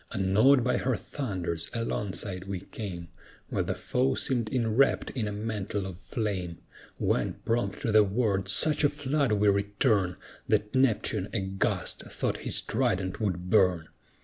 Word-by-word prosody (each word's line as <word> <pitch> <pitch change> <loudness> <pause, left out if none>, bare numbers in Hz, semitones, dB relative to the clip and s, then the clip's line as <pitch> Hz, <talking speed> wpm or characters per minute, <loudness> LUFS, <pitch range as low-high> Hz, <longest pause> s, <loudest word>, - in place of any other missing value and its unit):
Unawed 110 +8 +4
by 125 - +1
her 130 -1 0
thunders, 90 - -3
alongside 100 -4 -3
we 95 -2 -4
came, 95 -4 -7 0.4
While - - -1
the - - -2
foe 130 +2 0
seemed 120 -4 0
enwrapped 125 +1 +2
in 115 -5 -2
a - - -3
mantle 105 -2 -3
of 90 -2 -7
flame; 95 -6 -3 0.4
When, - - 0
prompt 115 +1 -1
to 115 - +1
the 110 0 +7
word, 100 -2 0
such 150 +9 +4
a 145 - +5
flood 145 -3 0
we 105 0 +2
return, 100 -1 +1 0.3
That 105 0 +1
Neptune, 115 -6 +1
aghast, 95 -2 -1
thought - - -2
his - - -1
trident 95 +3 -1
would 90 -3 -2
burn. 90 -6 +3
105 Hz, 150 wpm, -28 LUFS, 95-120 Hz, 0.4 s, the